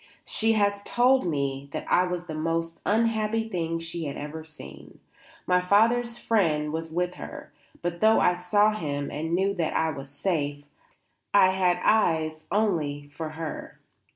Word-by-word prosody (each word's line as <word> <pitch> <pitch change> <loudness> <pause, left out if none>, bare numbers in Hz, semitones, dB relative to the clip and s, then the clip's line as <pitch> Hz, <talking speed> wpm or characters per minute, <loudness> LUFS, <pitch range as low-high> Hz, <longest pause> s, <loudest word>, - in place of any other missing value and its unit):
She 225 0 +2
has 200 -1 +1
told 250 0 +3
me 140 -3 -2
that - - -4
I 180 +1 +3
was 180 -1 -4
the 160 - -6
most 165 +1 -2
unhappy 225 0 +1
thing 170 -6 -2
that 165 - -6
she 165 0 -5
had 140 - -5
ever 155 +2 -6
seen. 70 - -13 0.5
My 180 0 +3
father's 230 +5 +3
friend 155 -11 +1
was 160 0 -4
with 180 +2 -1
her; - - -9 0.3
but 175 0 -2
though 220 +3 +5
I 180 - +4
saw 205 +4 +2
him 145 -8 -3
and 160 +3 -2
knew 195 +2 +1
that 170 -5 -2
I 160 0 +1
was 135 -2 -8
safe, 145 -2 -2 0.7
I 185 -2 +6
had 180 -2 +2
eyes 160 -7 +2
only 155 -9 0
for 155 +2 -6
her. 160 0 -7
170 Hz, 165 wpm, -26 LUFS, 155-200 Hz, 0.7 s, I